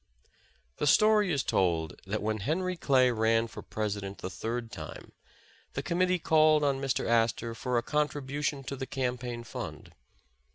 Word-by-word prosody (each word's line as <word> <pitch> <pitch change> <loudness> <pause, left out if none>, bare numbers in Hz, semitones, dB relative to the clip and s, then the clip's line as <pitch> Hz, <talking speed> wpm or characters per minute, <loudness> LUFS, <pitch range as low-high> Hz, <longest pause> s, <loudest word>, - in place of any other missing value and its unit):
The 150 - 0
story 210 +3 +5
is 140 -5 +1
told 85 -4 0
that 105 +2 -2
when 110 0 -1
Henry 180 - -1
Clay 130 -6 +3
ran 115 0 +2
for 115 - -9
President 100 -2 -4
the 95 - -6
third 115 +4 -4
time, - - -8 0.6
the - - -3
committee 180 +1 +2
called 155 -2 +4
on 140 -2 +1
Mr, 135 -1 0
Astor 115 0 +1
for 125 +2 -1
a 120 - +1
contribution 145 -1 -1
to 140 - -5
the 130 0 -5
campaign 125 -2 -3
fund. 115 - -7
125 Hz, 155 wpm, -29 LUFS, 115-150 Hz, 0.6 s, story